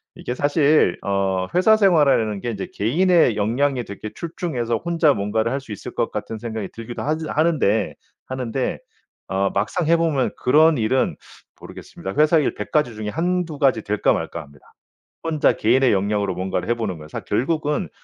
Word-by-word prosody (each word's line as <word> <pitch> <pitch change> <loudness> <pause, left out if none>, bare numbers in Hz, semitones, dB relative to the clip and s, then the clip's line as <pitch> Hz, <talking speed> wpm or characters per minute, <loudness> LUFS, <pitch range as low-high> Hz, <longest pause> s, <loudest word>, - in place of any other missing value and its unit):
이게 125 - -5
사실 145 - +3
어 95 -2 0
회사 215 +5 +5
생활이라는 145 - +3
게 120 - -3
이제 100 -3 -5
개인의 160 - +3
역량이 125 +4 0
되게 100 +2 -7
출중해서 145 -9 -3
혼자 165 0 +2
뭔가를 110 +2 -1
할 135 +1 -2
수 115 - -12
있을 100 - -7
것 - - -1
같은 110 - -5
생각이 110 -3 -5
들기도 115 +1 -7
하즈 155 +1 -2
하는데, 150 -10 +1 0.3
하는데 130 -1 -3 0.5
어 95 0 0
막상 110 - -1
해 170 - +5
보면 155 -6 +1
그런 155 +4 +5
일은 120 +4 +1 0.4
모르겠습니다. 95 - -9
회사 155 +2 +5
일 145 - 0
100 - - -6
가지 135 -7 +1
중에 105 -1 -4
1-2 170 +1 -2
가지 130 -6 +2
될까 105 0 +1
말까 85 - -4
합니다, 70 -3 -17 0.6
혼자 160 -2 +2
개인의 125 +3 +3
역량으로 100 0 0
뭔가를 95 +1 -3
해 120 - +2
보는 105 -7 -3
건. 75 - -11
사 - - -5
결국은 150 - -1
125 Hz, 350 characters per minute, -22 LUFS, 105-155 Hz, 0.6 s, 회사